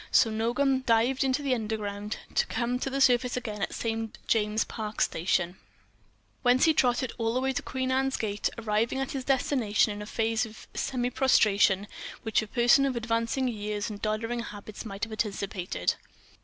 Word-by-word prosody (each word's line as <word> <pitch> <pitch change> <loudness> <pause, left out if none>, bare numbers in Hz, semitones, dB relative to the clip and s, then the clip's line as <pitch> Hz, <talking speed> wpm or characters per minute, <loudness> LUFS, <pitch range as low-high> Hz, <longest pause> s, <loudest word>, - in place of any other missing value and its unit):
So 225 - +4
Nogam 255 +4 +1
dived 235 +4 +3
into 270 +2 0
the 270 -2 +1
Underground, 210 -2 -3 0.2
to - - +2
come 240 +2 -1
to 270 - -2
the 270 +1 -2
surface 250 -1 +3
again 215 -4 -4
at - - -2
St. 225 -1 -3
James's 215 -1 +1
Park 215 -2 -6
station, 175 +1 +1 0.8
whence 250 +1 +4
he 320 - +5
trotted 250 -2 +2
all 225 +1 0
the - - +2
way 265 +1 0
to - - -2
Queen 260 0 -2
Anne's 265 +1 +1
Gate, 205 -2 -1
arriving 225 +2 0
at 270 - -2
his 270 -2 -3
destination 245 -6 +2
in 205 - -7
a 210 - -7
phase 225 0 0
of 220 -1 -9
semi 250 -2 -1
prostration 205 -6 +4 0.4
which 220 -2 +2
a 220 - -6
person 245 +4 +4
of 260 - -2
advancing 230 +2 0
years 210 -2 -3
and 205 - -8
doddering 225 +2 -1
habits 210 -1 -8
might 200 -2 -6
have 225 -1 -2
anticipated. 195 - -2
230 Hz, 180 wpm, -28 LUFS, 210-255 Hz, 0.8 s, he